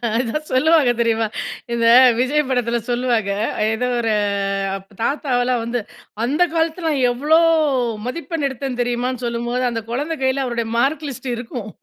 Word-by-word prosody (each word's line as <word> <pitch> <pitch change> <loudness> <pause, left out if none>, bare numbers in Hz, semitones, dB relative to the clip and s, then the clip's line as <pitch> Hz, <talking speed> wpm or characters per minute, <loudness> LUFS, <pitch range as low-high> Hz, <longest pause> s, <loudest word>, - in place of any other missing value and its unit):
அதான் 255 +6 -1
சொல்லுவாங்க, 295 0 +4
தெரியுமா? 225 -1 +1 0.5
இந்த 235 -1 +1 0.3
விஜய் 275 +5 +2
படத்துல 240 -2 0
சொல்லுவாங்க. 240 -4 0 0.4
ஏதோ 245 +3 -1
ஒரு 225 -1 0 0.6
அப்ப 195 +1 -11
தாத்தாவெல்லாம் 250 -2 0
வந்து, 235 +1 -2 0.4
அந்த 290 +9 +2
காலத்துல 330 +1 -1
நான் 280 -4 0
எவ்வளோ 295 +6 +3 0.7
மதிப்பெண் 325 +3 -3
எடுத்தேன் 265 -1 -5
தெரியுமான்னு 245 +1 -2
சொல்லும்போது, 240 +1 -2
அந்த 230 -1 -3
குழந்தை 290 +7 -2
கையில 265 +1 +1
அவருடைய 235 -2 -2
மார்க் 280 +5 +1
லிஸ்ட் 260 -1 -6
இருக்கும். 235 -2 -6
250 Hz, 135 wpm, -20 LUFS, 235-280 Hz, 0.7 s, சொல்லுவாங்க